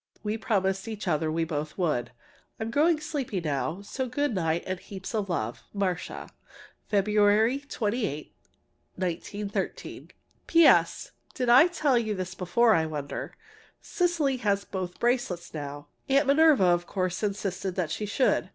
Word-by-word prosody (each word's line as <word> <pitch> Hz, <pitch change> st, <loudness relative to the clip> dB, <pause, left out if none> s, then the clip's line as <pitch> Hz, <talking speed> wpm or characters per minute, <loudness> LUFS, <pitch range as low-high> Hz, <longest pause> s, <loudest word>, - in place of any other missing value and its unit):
We 210 Hz, 0 st, -1 dB
promised 195 Hz, -2 st, 0 dB
each 215 Hz, -3 st, -5 dB
other 155 Hz, -1 st, +1 dB
we 165 Hz, +1 st, 0 dB
both 155 Hz, -2 st, -4 dB
would. 150 Hz, -, 0 dB, 0.5 s
I'm 220 Hz, 0 st, -3 dB
growing 310 Hz, +5 st, +3 dB
sleepy 290 Hz, -, -3 dB
now, 155 Hz, +4 st, -2 dB
so 260 Hz, +5 st, -4 dB
good 285 Hz, +1 st, 0 dB
night 165 Hz, -3 st, 0 dB
and 185 Hz, -1 st, -3 dB
heaps 190 Hz, +2 st, -8 dB
of 210 Hz, -3 st, -1 dB
love. 120 Hz, -9 st, -2 dB
MARCIA. 185 Hz, -4 st, -2 dB, 0.6 s
February 210 Hz, +4 st, +3 dB
28, 215 Hz, -, -3 dB, 0.6 s
1913. 200 Hz, +3 st, -4 dB, 0.4 s
P. 335 Hz, -1 st, +6 dB
S. -, -, +4 dB, 0.2 s
Did 250 Hz, -2 st, -1 dB
I 255 Hz, +8 st, +8 dB
tell 300 Hz, -8 st, +2 dB
you 220 Hz, -2 st, -2 dB
this 185 Hz, -1 st, -4 dB
before, 205 Hz, +6 st, +3 dB
I 160 Hz, -3 st, +2 dB
wonder? 150 Hz, -2 st, -5 dB, 0.4 s
Cecily 335 Hz, -7 st, 0 dB
has 200 Hz, -4 st, 0 dB
both 185 Hz, -2 st, -4 dB
the -, -, -25 dB
bracelets 240 Hz, -8 st, 0 dB
now. 145 Hz, -1 st, -6 dB, 0.2 s
Aunt 275 Hz, +2 st, +4 dB
Minerva, 290 Hz, -4 st, +5 dB
of 175 Hz, -1 st, +2 dB
course 185 Hz, -2 st, -2 dB
insisted 195 Hz, -3 st, -2 dB
that 170 Hz, -5 st, -1 dB
she 210 Hz, +5 st, -3 dB
should. 255 Hz, +6 st, +1 dB
200 Hz, 150 wpm, -27 LUFS, 175-245 Hz, 0.6 s, I